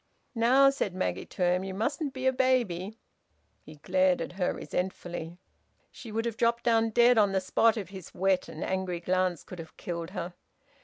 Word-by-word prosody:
"Now," 260 Hz, +4 st, +5 dB
said 200 Hz, -9 st, -3 dB
Maggie 90 Hz, -, -2 dB
to 185 Hz, -, -3 dB
him, 180 Hz, +1 st, +2 dB
"you 190 Hz, -1 st, -5 dB
mustn't 280 Hz, -, -1 dB
be 260 Hz, 0 st, -6 dB
a 260 Hz, -, +4 dB
baby!" 230 Hz, -7 st, 0 dB, 0.6 s
He 155 Hz, -, -13 dB
glared 185 Hz, +4 st, +2 dB
at -, -, -4 dB
her 180 Hz, 0 st, -1 dB
resentfully. 175 Hz, -2 st, -4 dB, 0.5 s
She 230 Hz, -, -10 dB
would 225 Hz, +2 st, -1 dB
have 230 Hz, -2 st, -3 dB
dropped 235 Hz, 0 st, +1 dB
down 225 Hz, -1 st, +3 dB
dead 240 Hz, +1 st, +5 dB
on 200 Hz, -2 st, +3 dB
the 190 Hz, -, +3 dB
spot 225 Hz, +4 st, +2 dB
if 195 Hz, -4 st, -5 dB
his 190 Hz, -2 st, -10 dB
wet 190 Hz, 0 st, +1 dB
and -, -, -6 dB
angry 185 Hz, -2 st, -2 dB
glance 180 Hz, -1 st, 0 dB
could 180 Hz, -, -10 dB
have 160 Hz, -1 st, -10 dB
killed 170 Hz, -1 st, -5 dB
her. 180 Hz, -2 st, -5 dB
190 Hz, 190 wpm, -29 LUFS, 180-235 Hz, 0.6 s, Now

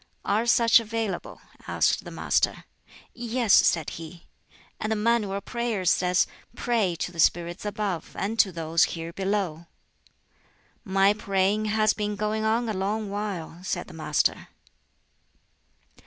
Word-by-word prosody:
"Are 220 Hz, +4 st, +1 dB
such 235 Hz, -1 st, +6 dB
available?" 225 Hz, -4 st, -4 dB, 0.3 s
asked -, -, +1 dB
the -, -, -7 dB
Master. -, -, 0 dB, 0.5 s
"Yes," 235 Hz, -2 st, 0 dB
said 165 Hz, -3 st, +4 dB
he; 165 Hz, +1 st, -11 dB, 0.5 s
"and 215 Hz, -, -2 dB
the -, -, +2 dB
Manual 215 Hz, -2 st, +1 dB
of 200 Hz, -, -5 dB
Prayers 235 Hz, -7 st, 0 dB
says, 180 Hz, 0 st, +2 dB, 0.3 s
'Pray 225 Hz, -8 st, 0 dB
to 175 Hz, -, -4 dB
the 170 Hz, -, -11 dB
spirits 175 Hz, +3 st, +1 dB
above 205 Hz, -4 st, -3 dB
and 220 Hz, +3 st, -2 dB
to 195 Hz, -, +5 dB
those 165 Hz, -1 st, +1 dB
here 165 Hz, 0 st, -6 dB
below,'" 190 Hz, -4 st, -2 dB, 1.2 s
"My 195 Hz, 0 st, +3 dB
praying 200 Hz, 0 st, 0 dB
has 215 Hz, 0 st, +2 dB
been 210 Hz, -1 st, -2 dB
going 215 Hz, +1 st, -1 dB
on 225 Hz, +2 st, +1 dB
a 220 Hz, -, -1 dB
long 200 Hz, +2 st, -2 dB
while," 195 Hz, -5 st, -4 dB
said 185 Hz, -, -2 dB
the 185 Hz, -, -12 dB
Master. 155 Hz, -2 st, 0 dB
205 Hz, 140 wpm, -26 LUFS, 180-220 Hz, 1.2 s, such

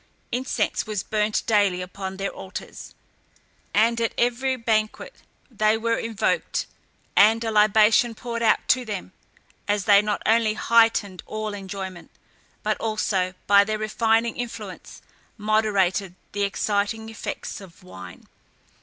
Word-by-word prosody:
Incense 250 Hz, -4 st, -1 dB
was 210 Hz, -3 st, -2 dB
burnt 215 Hz, 0 st, 0 dB
daily 205 Hz, -4 st, +2 dB
upon 190 Hz, +1 st, -6 dB
their 195 Hz, 0 st, -2 dB
altars, 190 Hz, -, -9 dB, 0.8 s
and 230 Hz, +2 st, +2 dB
at 230 Hz, -, -1 dB
every 245 Hz, +2 st, +1 dB
banquet 230 Hz, -, -1 dB, 0.4 s
they 215 Hz, -1 st, +2 dB
were 230 Hz, +1 st, 0 dB
invoked, 225 Hz, -2 st, -1 dB, 0.5 s
and 220 Hz, +3 st, +5 dB
a 225 Hz, -, -1 dB
libation 215 Hz, +2 st, +4 dB
poured 235 Hz, 0 st, -5 dB
out 225 Hz, -, +2 dB
to 255 Hz, -, +3 dB
them, 205 Hz, -5 st, -6 dB, 0.6 s
as 205 Hz, -2 st, 0 dB
they 205 Hz, -1 st, +7 dB
not 210 Hz, 0 st, -2 dB
only 220 Hz, -1 st, +3 dB
heightened 225 Hz, -6 st, +2 dB
all 215 Hz, -1 st, -4 dB
enjoyment, 190 Hz, -2 st, -7 dB, 0.5 s
but -, -, 0 dB
also 195 Hz, -4 st, -1 dB
by 200 Hz, 0 st, +6 dB
their 215 Hz, +1 st, -2 dB
refining 225 Hz, +1 st, +1 dB
influence 245 Hz, -1 st, -7 dB, 0.3 s
moderated 205 Hz, -4 st, +1 dB, 0.2 s
the 205 Hz, -, -3 dB
exciting 205 Hz, +2 st, -1 dB
effects 225 Hz, -1 st, -6 dB
of 190 Hz, 0 st, -15 dB
wine. 95 Hz, -, -12 dB
215 Hz, 130 wpm, -24 LUFS, 200-225 Hz, 0.8 s, they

